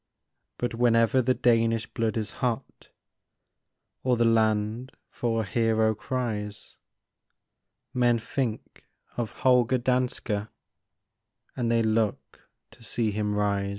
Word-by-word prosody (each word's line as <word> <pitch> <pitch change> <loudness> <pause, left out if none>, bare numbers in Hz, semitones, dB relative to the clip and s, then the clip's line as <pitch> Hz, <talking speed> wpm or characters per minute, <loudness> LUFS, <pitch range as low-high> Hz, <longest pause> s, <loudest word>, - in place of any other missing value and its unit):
But 120 - -2
whenever 115 +1 +3
the 130 +1 +1
Danish 115 -2 +2
blood 115 0 -2
is 110 -2 -2
hot, 120 -3 -3 1.1
Or 125 -2 +1
the 115 - +3
land 110 +2 +1 0.2
for 115 -2 -1
a - - -6
hero 110 +2 +2
cries, 105 -2 -4 1.2
Men 120 -1 +3
think 115 0 -4 0.3
of 120 -3 -3
Holger 125 -1 +3
Danske, 125 -4 -1 1.1
And 120 -2 -1
they 115 -1 +3
look 110 -1 -1 0.2
to 115 +2 -19
see 115 -1 -1
him 105 0 -1
rise. 100 -1 0
115 Hz, 115 wpm, -27 LUFS, 110-120 Hz, 1.2 s, whenever